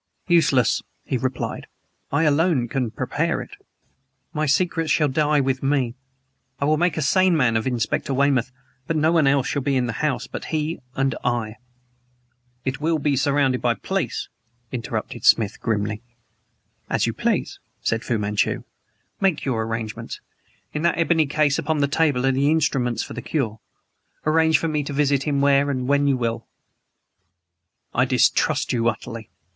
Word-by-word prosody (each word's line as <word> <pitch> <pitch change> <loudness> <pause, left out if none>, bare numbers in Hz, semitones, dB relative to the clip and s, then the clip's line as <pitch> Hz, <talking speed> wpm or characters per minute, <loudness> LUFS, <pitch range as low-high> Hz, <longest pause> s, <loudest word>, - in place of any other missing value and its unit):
"Useless," 140 - +3 0.2
he 135 - -2
replied. 130 +1 -3 0.4
"I 145 +3 +2
alone 150 -4 +2
can 125 -1 -1
prepare - - -1
it. - - -8 0.8
My 155 0 0
secrets 165 +2 +1
shall 150 0 +3
die 150 +2 +2
with 135 -1 -1
me. 135 -4 +1 0.7
I 140 - 0
will 155 +1 +3
make 175 -1 +1
a 155 - 0
sane 185 +4 +3
man 120 -6 +2
of 110 +2 0
Inspector 125 +2 -1
Weymouth, 135 -2 +2 0.4
but 165 - -1
no 155 +1 +3
one 165 -4 +3
else 135 -1 +3
shall 140 - -1
be 140 0 0
in 125 - +1
the 120 - -3
house 150 -3 0
but - - -7
he 155 +1 -2 0.2
and 135 -1 +1
I." 115 -3 -1 1.1
"It 130 +2 -3
will 160 +1 +1
be 145 -1 +1
surrounded 140 -1 +1
by 120 -1 +2
police," 195 +8 -3 0.4
interrupted 120 -3 -4
Smith 110 -2 +4
grimly. 105 -1 -1 0.9
"As - - +1
you - - -1
please," - - -1 0.2
said 115 0 -1
Fu 120 - 0
Manchu. 105 0 0 0.6
"Make 190 -6 +1
your 125 -5 0
arrangements. 115 0 -5 0.5
In 150 - -2
that 170 0 +2
ebony 165 -2 +2
case 145 -1 +2
upon 155 +1 -1
the 140 -1 +2
table 140 -4 +1
are 135 - +4
the 135 +2 +2
instruments 135 -6 +1
for - - -8
the - - -5
cure. 115 -8 -2 0.7
Arrange 160 0 +4
for 165 - -2
me 155 -2 0
to 140 - -5
visit 140 0 +1
him 140 -2 +1
where 140 0 +4
and 130 -2 -2
when 145 +1 +3
you 135 -2 +2
will 115 -2 -2 0.7
" 85 -1 -51
"I - - +3
distrust - - +2
you 115 -1 +2
utterly. 115 0 -6
140 Hz, 170 wpm, -23 LUFS, 120-155 Hz, 1.1 s, Smith